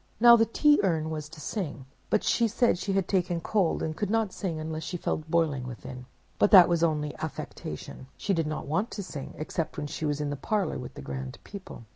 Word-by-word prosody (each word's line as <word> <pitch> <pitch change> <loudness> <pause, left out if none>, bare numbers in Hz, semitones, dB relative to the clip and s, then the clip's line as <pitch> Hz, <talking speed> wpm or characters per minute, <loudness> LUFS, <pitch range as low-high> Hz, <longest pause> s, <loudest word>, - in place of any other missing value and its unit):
"Now 235 +1 +9
the 225 -1 +3
Tea 295 +5 +4
Urn 160 -5 0
was 155 -1 -5
to 155 - -12
sing; 150 - -4 0.2
but - - +2
she 235 - +3
said 230 -3 +2
she 195 - -2
had 195 -2 +1
taken 180 -3 +1
cold 185 0 +1
and 155 0 -2
could 205 +3 -2
not 220 -3 +1
sing 170 -5 -3
unless 155 0 -4
she 180 - -4
felt 155 -1 -3
boiling 155 -6 +1
within. 125 +1 -8 0.3
But - - +5
that 185 -4 +10
was 170 -2 +1
only 150 -3 0
affectation: 145 -3 -6
she 200 - 0
did 165 -3 0
not 155 - -3
want 165 - 0
to 200 - -3
sing, 145 -7 -7
except 155 +2 -3
when 145 - -3
she 145 +2 -4
was 145 -1 0
in 145 -1 -2
the - - -2
parlor 195 +2 -1
with 125 - -8
the - - -8
grand 65 -1 -5
people. 195 - -10
160 Hz, 225 wpm, -28 LUFS, 150-195 Hz, 0.3 s, that